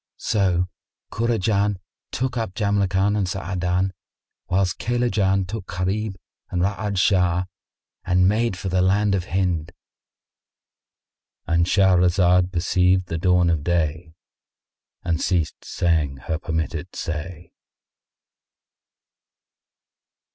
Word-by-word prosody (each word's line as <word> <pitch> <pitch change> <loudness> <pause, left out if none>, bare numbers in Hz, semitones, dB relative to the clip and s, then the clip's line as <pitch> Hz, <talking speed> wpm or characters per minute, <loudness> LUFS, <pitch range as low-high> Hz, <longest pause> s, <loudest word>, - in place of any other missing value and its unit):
So 90 -4 +1 0.5
Kurajan 105 -3 +1 0.3
took 130 0 -2
up 110 -6 -3
Jamrkan 100 -1 +1
and 100 -3 0
Sa'adan, 95 0 -1 0.6
whilst 90 0 +1
Kaylajan 105 -5 +1
took 100 -1 -6
Gharib 95 +4 -2 0.3
and 90 -1 -1
Ra'ad 100 +1 -1
Shah 90 -2 +3 0.6
and 90 0 +3
made 110 -1 +1
for 95 - -5
the 90 0 +1
land 100 +2 +2
of 95 -3 0
Hind.——And 85 -1 -5
Shahrazad 90 -1 +3
perceived 90 0 +2
the 80 - -2
dawn 90 -1 +3
of 80 -3 -1
day 80 -1 -1 0.9
and 85 -1 -1
ceased 85 -4 -1
saying 80 -6 0
her 80 - -2
permitted 80 +1 -3
say. 85 0 -5
90 Hz, 95 wpm, -23 LUFS, 85-100 Hz, 0.9 s, Shah